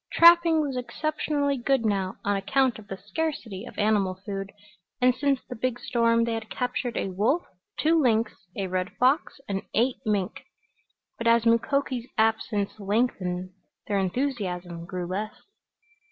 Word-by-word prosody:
Trapping 335 Hz, -1 st, +7 dB
was 280 Hz, -3 st, -2 dB
exceptionally 285 Hz, +2 st, -1 dB
good 260 Hz, -1 st, +1 dB
now 195 Hz, -3 st, 0 dB
on 205 Hz, 0 st, +2 dB
account 245 Hz, +5 st, +1 dB
of 210 Hz, -, -13 dB
the 195 Hz, -, -5 dB
scarcity 225 Hz, -, -4 dB
of -, -, -12 dB
animal 205 Hz, -3 st, +2 dB
food 195 Hz, -1 st, -4 dB, 0.5 s
and 250 Hz, 0 st, +5 dB
since 275 Hz, +1 st, +1 dB
the 250 Hz, -, -6 dB
big 245 Hz, +1 st, -1 dB
storm 230 Hz, -1 st, +2 dB
they 230 Hz, 0 st, 0 dB
had 225 Hz, -1 st, -4 dB
captured 245 Hz, -1 st, -2 dB
a -, -, -1 dB
wolf, 230 Hz, -, +1 dB, 0.3 s
two 320 Hz, +1 st, +3 dB
lynx, 230 Hz, -3 st, +2 dB, 0.2 s
a 195 Hz, -, -2 dB
red 185 Hz, 0 st, -1 dB
fox 265 Hz, +4 st, +2 dB
and 195 Hz, -1 st, -2 dB
eight 245 Hz, +3 st, +2 dB
mink. 205 Hz, -5 st, -1 dB, 0.8 s
But 230 Hz, -, -1 dB
as 230 Hz, 0 st, +5 dB
Mukoki's 245 Hz, +1 st, +1 dB
absence 220 Hz, -2 st, +1 dB
lengthened 195 Hz, -4 st, -1 dB, 0.3 s
their 200 Hz, -1 st, 0 dB
enthusiasm 185 Hz, -6 st, -2 dB
grew 180 Hz, -1 st, -4 dB
less. 205 Hz, +5 st, -3 dB
230 Hz, 150 wpm, -26 LUFS, 195-260 Hz, 0.8 s, Trapping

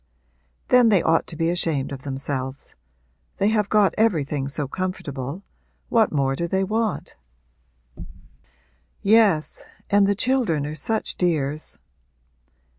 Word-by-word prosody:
'Then 250 Hz, -2 st, +6 dB
they 200 Hz, -5 st, +3 dB
ought 165 Hz, 0 st, +2 dB
to -, -, -6 dB
be 165 Hz, +1 st, 0 dB
ashamed 160 Hz, -6 st, -1 dB
of 135 Hz, -2 st, -6 dB
themselves. 135 Hz, 0 st, -4 dB, 0.6 s
They 200 Hz, -, +2 dB
have 210 Hz, -2 st, +1 dB
got 210 Hz, -3 st, +3 dB
everything 150 Hz, -10 st, +1 dB
so 140 Hz, 0 st, -3 dB
comfortable 150 Hz, -2 st, -5 dB, 0.5 s
what 225 Hz, -2 st, +3 dB
more 135 Hz, -2 st, +1 dB
do 170 Hz, +4 st, -2 dB
they 190 Hz, +2 st, 0 dB
want?' 215 Hz, +1 st, -2 dB, 1.9 s
'Yes, 200 Hz, -7 st, +3 dB, 0.3 s
and 200 Hz, -1 st, +5 dB
the 200 Hz, -, +2 dB
children 215 Hz, -, +1 dB
are 150 Hz, -, -4 dB
such 215 Hz, +9 st, -1 dB
dears!' 155 Hz, -4 st, -1 dB
170 Hz, 120 wpm, -23 LUFS, 140-205 Hz, 1.9 s, Then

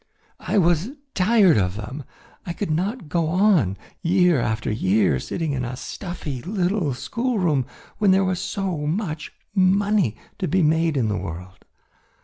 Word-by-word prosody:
I -, -, -1 dB
was 175 Hz, +2 st, +3 dB, 0.2 s
tired 195 Hz, -, +4 dB
of 90 Hz, -1 st, 0 dB
them. 125 Hz, +6 st, -7 dB, 0.4 s
I 175 Hz, -, -4 dB
could 195 Hz, -2 st, -3 dB
not 190 Hz, +5 st, -2 dB
go 165 Hz, +1 st, 0 dB
on 170 Hz, -, +3 dB, 0.2 s
year 180 Hz, -3 st, +3 dB
after 110 Hz, -1 st, -1 dB
year 95 Hz, -, +2 dB
sitting 160 Hz, -, -3 dB
in 130 Hz, -2 st, -2 dB
a 125 Hz, +1 st, -4 dB
stuffy 155 Hz, -, -6 dB
little 180 Hz, -, -1 dB
schoolroom 180 Hz, -, 0 dB, 0.3 s
when 210 Hz, -2 st, +3 dB
there 190 Hz, +1 st, +4 dB
was 185 Hz, -1 st, -1 dB
so 185 Hz, -6 st, -2 dB
much 160 Hz, -3 st, -3 dB, 0.2 s
money 195 Hz, -, +2 dB, 0.2 s
to 185 Hz, -, -1 dB
be 185 Hz, 0 st, +2 dB
made 160 Hz, 0 st, +2 dB
in 120 Hz, -4 st, +1 dB
the 105 Hz, -1 st, -1 dB
world. 90 Hz, +3 st, -8 dB
170 Hz, 150 wpm, -23 LUFS, 125-190 Hz, 0.4 s, tired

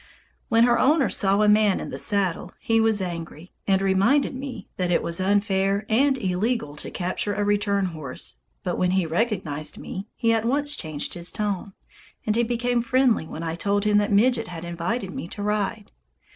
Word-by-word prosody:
When 230 Hz, 0 st, +5 dB
her 240 Hz, 0 st, +4 dB
owner 285 Hz, -1 st, +3 dB
saw 200 Hz, +1 st, +2 dB
a -, -, +4 dB
man 210 Hz, -1 st, +4 dB
in -, -, -6 dB
the -, -, -5 dB
saddle, 200 Hz, -5 st, -1 dB
he 225 Hz, 0 st, +2 dB
was 220 Hz, -3 st, +2 dB
angry, 170 Hz, -1 st, -7 dB, 0.2 s
and 195 Hz, -1 st, +3 dB
reminded 200 Hz, +11 st, +3 dB
me 265 Hz, 0 st, -7 dB
that 180 Hz, -1 st, 0 dB
it 175 Hz, -, +2 dB
was 170 Hz, +2 st, -2 dB
unfair 200 Hz, 0 st, +1 dB
and 265 Hz, +5 st, +3 dB
illegal 190 Hz, -, -1 dB
to -, -, -5 dB
capture 185 Hz, +3 st, -2 dB
a 205 Hz, -, 0 dB
return 205 Hz, -1 st, +1 dB
horse; 155 Hz, -7 st, -6 dB, 0.3 s
but -, -, -2 dB
when 180 Hz, -, +2 dB
he 185 Hz, -, +2 dB
recognized 165 Hz, -5 st, -1 dB
me, 195 Hz, +2 st, -7 dB
he 230 Hz, -1 st, +2 dB
at 225 Hz, -1 st, +1 dB
once 290 Hz, +4 st, 0 dB
changed 155 Hz, -3 st, -3 dB
his 175 Hz, 0 st, -3 dB
tone, 200 Hz, -2 st, -3 dB, 0.5 s
and 215 Hz, -, +1 dB
he 235 Hz, -, +3 dB
became 240 Hz, +1 st, 0 dB
friendly 240 Hz, -7 st, +2 dB
when 160 Hz, +1 st, -6 dB
I 165 Hz, -1 st, -2 dB
told 200 Hz, +4 st, 0 dB
him 210 Hz, -1 st, +4 dB
that 205 Hz, 0 st, 0 dB
Midget 230 Hz, +2 st, +3 dB
had 175 Hz, -1 st, -7 dB
invited 180 Hz, +5 st, -3 dB
me -, -, -5 dB
to 205 Hz, +3 st, -7 dB
ride. 210 Hz, 0 st, -2 dB
205 Hz, 190 wpm, -24 LUFS, 180-230 Hz, 0.5 s, When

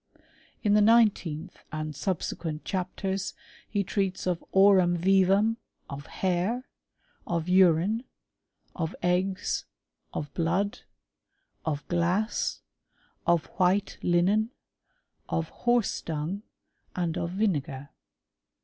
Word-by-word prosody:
In 205 Hz, -2 st, +3 dB
the 210 Hz, -, +6 dB
nineteenth 210 Hz, -8 st, +3 dB
and 155 Hz, -1 st, -4 dB
subsequent 165 Hz, -3 st, -3 dB
chapters 190 Hz, +1 st, -2 dB, 0.3 s
he 205 Hz, -2 st, 0 dB
treats 195 Hz, 0 st, -1 dB
of 180 Hz, -2 st, -1 dB
aurum 190 Hz, -3 st, +5 dB
vivum, 195 Hz, +5 st, +4 dB, 0.3 s
of 140 Hz, +1 st, -7 dB
hair, 190 Hz, +7 st, -1 dB, 0.6 s
of 170 Hz, -1 st, -1 dB
urine, 185 Hz, +4 st, +4 dB, 0.7 s
rf^ 160 Hz, -3 st, -3 dB
eggs, 185 Hz, +2 st, 0 dB, 0.5 s
of 145 Hz, -2 st, -5 dB
blood, 185 Hz, +5 st, 0 dB, 0.9 s
of 150 Hz, -2 st, -2 dB
glass, 175 Hz, +6 st, 0 dB, 0.7 s
of 170 Hz, -2 st, +3 dB
white 190 Hz, +2 st, +2 dB
linen, 190 Hz, +6 st, +3 dB, 0.8 s
of 165 Hz, 0 st, -1 dB
horse 240 Hz, -3 st, +1 dB
dung, 160 Hz, +5 st, -3 dB, 0.5 s
and 170 Hz, -2 st, -1 dB
of 170 Hz, -1 st, -2 dB
vinegar. 150 Hz, -8 st, -1 dB
185 Hz, 95 wpm, -28 LUFS, 165-200 Hz, 0.9 s, the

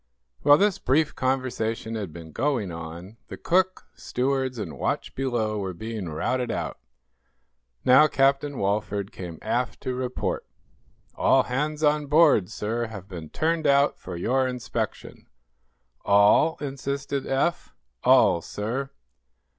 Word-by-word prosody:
While 145 Hz, +1 st, +7 dB
this 205 Hz, 0 st, +2 dB
brief 145 Hz, +4 st, +2 dB
conversation 125 Hz, -4 st, -1 dB
had 105 Hz, -6 st, -4 dB
been 80 Hz, -1 st, -10 dB
going 120 Hz, -, -1 dB
on, 85 Hz, +5 st, -8 dB
the -, -, -8 dB
cook, 185 Hz, +1 st, +1 dB
stewards 130 Hz, 0 st, -1 dB
and 100 Hz, -8 st, -6 dB
watch -, -, -2 dB
below 120 Hz, -5 st, -1 dB
were 95 Hz, -2 st, -4 dB
being 110 Hz, -2 st, -5 dB
routed 120 Hz, +11 st, -1 dB
out. -, -, -3 dB, 1.1 s
Now 130 Hz, +5 st, +7 dB
Captain 140 Hz, 0 st, +1 dB
Walford 100 Hz, 0 st, -1 dB
came 90 Hz, -7 st, -8 dB
aft 120 Hz, +3 st, -1 dB
to 130 Hz, -, -3 dB
report: 125 Hz, 0 st, -3 dB, 0.7 s
"All 135 Hz, -, +3 dB
hands 150 Hz, +5 st, -2 dB
on 150 Hz, -1 st, +2 dB
board, 145 Hz, -, +5 dB
sir, 115 Hz, +2 st, -2 dB
have 100 Hz, -4 st, -9 dB
been 85 Hz, -5 st, -8 dB
turned 160 Hz, 0 st, 0 dB
out 140 Hz, 0 st, +3 dB
for 90 Hz, -, -7 dB
your 130 Hz, +9 st, +1 dB
inspection." 125 Hz, -1 st, -5 dB, 0.8 s
"All?" 100 Hz, +11 st, +4 dB
insisted 140 Hz, 0 st, -3 dB
Eph. 140 Hz, +6 st, -1 dB, 0.3 s
"All, 85 Hz, -, +5 dB
sir." 120 Hz, +10 st, -4 dB
125 Hz, 130 wpm, -25 LUFS, 105-140 Hz, 1.1 s, While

